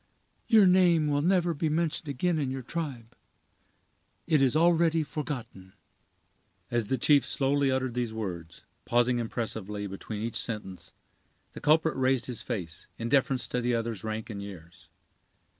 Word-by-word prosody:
Your 220 Hz, -4 st, +6 dB
name 180 Hz, -4 st, +5 dB
will 145 Hz, -1 st, +1 dB
never 175 Hz, 0 st, +2 dB
be 155 Hz, +1 st, -1 dB
mentioned 160 Hz, 0 st, -1 dB
again 160 Hz, +5 st, 0 dB
in 140 Hz, -3 st, -1 dB
your 130 Hz, 0 st, -4 dB
tribe—it 130 Hz, -6 st, -5 dB, 1.3 s
is 135 Hz, -1 st, +3 dB
already 165 Hz, 0 st, +3 dB
forgotten." 125 Hz, -11 st, -6 dB, 1.0 s
As 120 Hz, -2 st, +1 dB
the 130 Hz, -, 0 dB
chief 145 Hz, 0 st, +4 dB
slowly 140 Hz, 0 st, +1 dB
uttered 130 Hz, -2 st, 0 dB
these 120 Hz, -2 st, -2 dB
words, 90 Hz, -7 st, -6 dB, 0.2 s
pausing 120 Hz, +1 st, +2 dB
impressively 110 Hz, -3 st, -4 dB
between 105 Hz, +2 st, -6 dB
each 115 Hz, -, -3 dB
sentence, 105 Hz, -5 st, -4 dB, 0.6 s
the -, -, -9 dB
culprit 160 Hz, +1 st, +3 dB
raised 130 Hz, -1 st, +1 dB
his 125 Hz, -4 st, -5 dB
face, 90 Hz, -8 st, -6 dB
in 115 Hz, 0 st, -3 dB
deference 135 Hz, -1 st, +2 dB
to 125 Hz, -, -1 dB
the 120 Hz, 0 st, +1 dB
other's 115 Hz, -4 st, -3 dB
rank 110 Hz, +1 st, -4 dB
and 100 Hz, -1 st, -6 dB
years. 90 Hz, -4 st, -11 dB
125 Hz, 145 wpm, -28 LUFS, 110-150 Hz, 1.3 s, Your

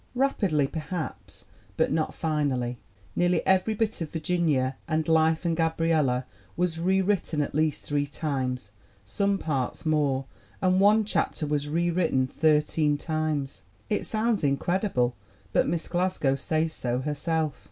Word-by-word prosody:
Rapidly, 200 Hz, -, +2 dB
perhaps, 155 Hz, +2 st, -6 dB, 0.3 s
but -, -, +2 dB
not 155 Hz, +1 st, 0 dB
finally. 135 Hz, -6 st, -1 dB, 0.4 s
Nearly 175 Hz, 0 st, +2 dB
every 190 Hz, +3 st, +3 dB
bit 220 Hz, -2 st, -1 dB
of 160 Hz, -, -3 dB
Virginia 155 Hz, -6 st, 0 dB
and 155 Hz, -1 st, 0 dB
Life 160 Hz, +1 st, +3 dB
and 165 Hz, -1 st, +1 dB
Gabriella 160 Hz, -6 st, +1 dB, 0.3 s
was 170 Hz, -2 st, 0 dB
rewritten 190 Hz, -2 st, +1 dB
at -, -, -5 dB
least 155 Hz, 0 st, 0 dB
three 145 Hz, -1 st, 0 dB
times, 130 Hz, -7 st, -3 dB, 0.3 s
some 200 Hz, -, 0 dB
parts 140 Hz, -4 st, -2 dB
more; 145 Hz, -4 st, +1 dB, 0.3 s
and 185 Hz, 0 st, +3 dB
one 210 Hz, +2 st, +5 dB
chapter 185 Hz, -5 st, -1 dB
was 145 Hz, 0 st, -1 dB
rewritten 165 Hz, -4 st, +1 dB
thirteen 150 Hz, +1 st, +2 dB
times. 155 Hz, -3 st, -2 dB, 0.3 s
It 210 Hz, -, +1 dB
sounds 220 Hz, -2 st, 0 dB
incredible, 140 Hz, -, +1 dB, 0.4 s
but -, -, +3 dB
Miss 165 Hz, +1 st, -1 dB
Glasgow 175 Hz, -6 st, +1 dB
says 155 Hz, +3 st, -1 dB
so 125 Hz, -2 st, -2 dB
herself. 150 Hz, +1 st, -1 dB
155 Hz, 130 wpm, -27 LUFS, 145-175 Hz, 0.4 s, one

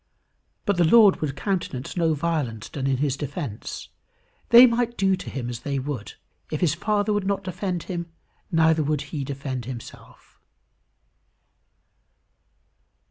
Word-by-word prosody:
But 200 Hz, -3 st, +1 dB
the 175 Hz, -, +4 dB
Lord 205 Hz, +3 st, +6 dB
would 145 Hz, -3 st, -2 dB
countenance 155 Hz, -7 st, -3 dB
no 165 Hz, -3 st, +2 dB
violence 140 Hz, -9 st, -2 dB
done 135 Hz, -2 st, -3 dB
in 135 Hz, -1 st, +1 dB
his 140 Hz, 0 st, 0 dB
defence. 140 Hz, -, -6 dB, 0.6 s
They 240 Hz, +2 st, +10 dB
might 240 Hz, 0 st, 0 dB
do 195 Hz, -1 st, +3 dB
to 185 Hz, -, -8 dB
him 125 Hz, -3 st, -4 dB
as 120 Hz, -1 st, -5 dB
they 140 Hz, +2 st, -3 dB
would. 130 Hz, -5 st, -4 dB, 0.4 s
If 155 Hz, -, -3 dB
his 165 Hz, -5 st, +3 dB
Father 210 Hz, +4 st, 0 dB
would 205 Hz, -2 st, -1 dB
not 200 Hz, 0 st, 0 dB
defend 185 Hz, -1 st, -3 dB
him, 170 Hz, -2 st, -4 dB, 0.4 s
neither 160 Hz, -1 st, +4 dB
would 150 Hz, -1 st, 0 dB
he 145 Hz, -3 st, -2 dB
defend 135 Hz, -3 st, -5 dB
himself. 125 Hz, -2 st, -11 dB
160 Hz, 140 wpm, -24 LUFS, 135-190 Hz, 0.6 s, They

